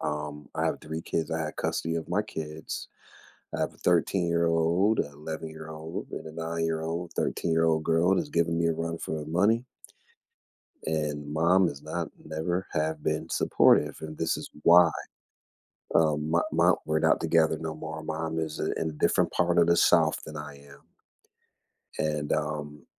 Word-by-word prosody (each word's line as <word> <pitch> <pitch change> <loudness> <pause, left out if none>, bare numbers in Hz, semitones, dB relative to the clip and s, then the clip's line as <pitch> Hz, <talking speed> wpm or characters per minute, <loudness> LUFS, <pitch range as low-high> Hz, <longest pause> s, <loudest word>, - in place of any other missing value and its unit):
Um, 75 -1 -4
I - - 0
have - - -1
3 80 +1 -5
kids. 80 - -2
I 80 0 -1
have 80 - -4
custody 80 0 -1
of 80 - -4
my 100 +4 +1
kids. 80 -5 -6 0.7
I - - -4
have - - 0
a - - -21
thirteen-year-old, 85 +2 +2
an - - +2
eleven-year-old, 80 +1 -7
and - - -6
a - - -8
nine-year-old, 80 +1 -3
thirteen-year-old 80 -1 +1
girl 85 +4 +3
is 150 - -2
giving 85 - +1
me 85 - +1
a 80 - +2
run 85 +1 -3
for 80 - -4
her 75 - -6
money 105 +9 +2 1.2
and 75 -2 -2
mom 85 +4 +4
has 70 -3 -7
not - - -3 0.2
never 80 +4 -2
have 80 -1 -1
been 80 +1 -1
supportive. 75 0 +4
And 80 0 -7
this 80 0 0
is - - -8
why. 85 -1 +7 1.0
Um, 75 -1 +2
my 85 +1 +3
my - - +4
we're - - +1
not - - +3
together 80 -1 +3
no 80 -1 -4
more. 80 0 -6
Mom 80 +1 -3
is 80 -1 -3
i - - -1 0.2
in 80 - 0
a - - -7
different 75 - +2
part 85 0 +2
of 85 - +5
the 85 0 +4
South - - +4
than 75 - -9
I 75 -1 -7
am. 70 0 -15 1.2
And, 75 -1 -1
um 75 -1 -3
80 Hz, 170 wpm, -28 LUFS, 75-85 Hz, 1.2 s, why